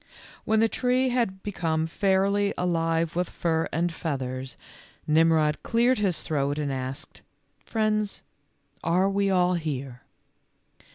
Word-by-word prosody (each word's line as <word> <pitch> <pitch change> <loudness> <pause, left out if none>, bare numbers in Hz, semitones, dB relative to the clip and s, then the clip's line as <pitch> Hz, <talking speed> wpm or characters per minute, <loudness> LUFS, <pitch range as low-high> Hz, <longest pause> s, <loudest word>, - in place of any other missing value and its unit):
When 220 0 +3
the 225 - +5
tree 255 +2 +1
had 230 -7 -1
become 165 -5 -1
fairly 200 +3 +1
alive 165 -2 0
with 180 0 0
fur 165 -1 -1
and 170 +2 0
feathers, 130 -5 -4 0.5
Nimrod 155 -1 +3
cleared 240 +2 +2
his 195 -5 0
throat 145 -1 -1
and 145 -2 -1
asked, 130 0 -5 0.4
"Friends, 215 -2 -1 0.6
are 180 +3 +2
we 200 0 +1
all 180 -1 +3
here?" 140 -7 -4
170 Hz, 120 wpm, -26 LUFS, 155-200 Hz, 0.6 s, the